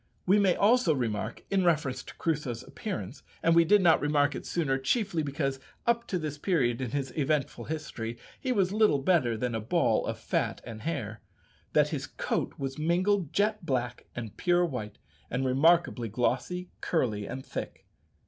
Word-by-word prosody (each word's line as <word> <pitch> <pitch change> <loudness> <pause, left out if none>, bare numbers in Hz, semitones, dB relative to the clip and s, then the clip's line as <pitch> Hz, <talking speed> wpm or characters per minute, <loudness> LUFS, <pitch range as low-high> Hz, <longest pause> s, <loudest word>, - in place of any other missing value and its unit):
We 195 +3 +5
may 190 -3 +4
also 210 -6 +4
remark, 115 -3 -3
in 195 -1 +3
reference 150 -7 +1
to - - -12
Crusoe's 145 -8 -2
appearance - - -6 0.2
(and 165 - +5
we 170 0 +7
did 200 +4 +4
not 165 -2 +5
remark 145 -1 +2
it - - -6
sooner, 135 -6 0
chiefly 190 - 0
because 140 -2 -2 0.3
up 235 0 +1
to 185 - -1
this 150 -3 -4
period 135 -9 +1
in 130 - -2
his 135 -1 -3
eventful 140 -5 0
history 120 -7 -5 0.2
he 260 - -1
was 195 -5 +2
little 215 -8 +4
better 135 -6 +2
than 125 +1 -2
a 110 - -1
ball 115 0 +1
of - - -2
fat - - -1
and 115 -2 -8
hair), 115 -9 -4 0.5
that - - +4
his - - -3
coat - - -2
was 135 +1 -4
mingled 180 +1 +1
jet 210 0 +1
black 125 -5 -2
and 115 -4 -6
pure 175 0 +3
white, 125 -10 -5 0.3
and 125 +2 -1
remarkably 135 -2 +3
glossy, 130 - -1
curly, 110 - 0
and 130 +1 -6
thick. - - -6
145 Hz, 175 wpm, -29 LUFS, 125-175 Hz, 0.5 s, we